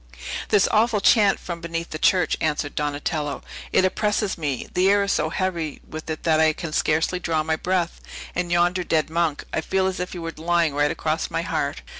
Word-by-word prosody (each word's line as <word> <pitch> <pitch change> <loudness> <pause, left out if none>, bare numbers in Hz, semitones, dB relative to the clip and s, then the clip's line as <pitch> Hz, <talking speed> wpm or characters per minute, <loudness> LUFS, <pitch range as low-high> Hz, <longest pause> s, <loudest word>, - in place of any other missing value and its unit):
"This 200 - +4
awful 220 0 +3
chant 200 0 +4
from 170 -2 -6
beneath 170 0 -4
the 155 - -5
church," 180 +2 +3
answered 150 -1 -1
Donatello; 145 0 -2 0.3
"it 190 - +4
oppresses 210 +1 0
me; 145 -6 -3
the 185 +1 +3
air 200 0 +4
is 200 - 0
so 155 - +1
heavy 170 -4 -2
with 155 +1 -8
it 155 - -4
that 160 -2 +3
I 160 0 +4
can 160 -1 -6
scarcely 160 +5 +1
draw 160 -3 0
my 160 0 0
breath. 175 +1 -1 0.3
And 175 -1 -2
yonder 175 +1 +2
dead 155 -2 0
monk! 165 -3 0
I - - 0
feel 190 +3 0
as 190 -1 -1
if 180 - -4
he - - -6
were 165 -1 -5
lying 170 -1 +1
right 145 +1 +2
across - - -1
my - - -2
heart." - - -2
170 Hz, 205 wpm, -23 LUFS, 155-185 Hz, 0.3 s, This